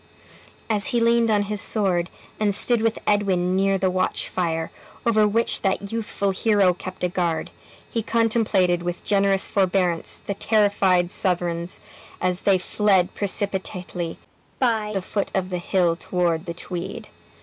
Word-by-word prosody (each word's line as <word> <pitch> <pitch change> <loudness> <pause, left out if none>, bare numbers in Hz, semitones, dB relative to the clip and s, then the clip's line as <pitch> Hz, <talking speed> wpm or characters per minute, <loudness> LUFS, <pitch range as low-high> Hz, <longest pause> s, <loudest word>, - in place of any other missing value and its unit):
As 210 -2 0
he 245 -4 +1
leaned 230 0 +3
on 205 -1 +3
his 210 0 -2
sword, 185 -5 +1 0.3
and 205 -2 +2
stood 235 +1 +2
with 225 0 +1
Edwin 185 -3 +1
near 195 0 +2
the 190 -1 +1
watch 185 0 -1
fire, 165 -3 -2 0.3
over 215 -2 +4
which 230 +3 +1
that 195 0 -1
youthful 210 -3 -1
hero 195 -2 +3
kept 185 +1 -8
a - - +3
guard, 175 -3 -2 0.4
he 230 - -2
contemplated 215 -6 +2
with 175 0 -4
generous 195 -1 +2
forbearance 185 -3 0
the 200 - -2
terrified 200 -4 +2
Southrons 175 -2 -1 0.4
as 180 0 0
they 195 -2 +4
fled 190 -1 +1
precipitately 190 -4 -3 0.4
by 225 -4 +1
the 195 -3 -2
foot 200 +1 -2
of 190 -1 -1
the 180 - -1
hill 175 -1 +1
toward 170 -1 -1
the 170 - -4
Tweed. 180 +2 -6
195 Hz, 150 wpm, -23 LUFS, 180-210 Hz, 0.4 s, over